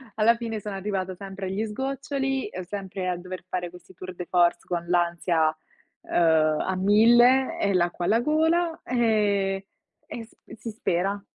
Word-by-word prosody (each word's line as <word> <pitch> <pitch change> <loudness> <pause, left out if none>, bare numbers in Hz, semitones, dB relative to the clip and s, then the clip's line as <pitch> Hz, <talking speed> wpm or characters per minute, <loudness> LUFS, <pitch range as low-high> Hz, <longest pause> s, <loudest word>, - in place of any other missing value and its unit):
alla 225 +2 +4
fine 225 -2 -4
sono 205 -1 -6
arrivata 190 -1 -3
sempre 195 0 -7
agli 200 +4 -2
sgoccioli, 270 +2 -2 0.2
sempre 190 -2 -5
a 180 - -1
dover 185 0 -8
fare 180 -1 -3
questi 180 +1 -15
tour 185 0 -9
de 180 - -6
force, 175 -1 +3
con 170 -1 -3
l'ansia, 170 -2 +1 0.5
uhm, 160 -2 +2
a 190 - -1
1000 240 - +5
e 200 - +1
l'acqua 175 -1 0
alla 225 +5 +3
gola, 320 +3 +1
ehm, 205 -5 +1 0.5
e 230 - -6
s 225 - -19 0.2
si 230 0 -7
spera. 195 0 -1
195 Hz, 155 wpm, -25 LUFS, 180-230 Hz, 0.5 s, 1000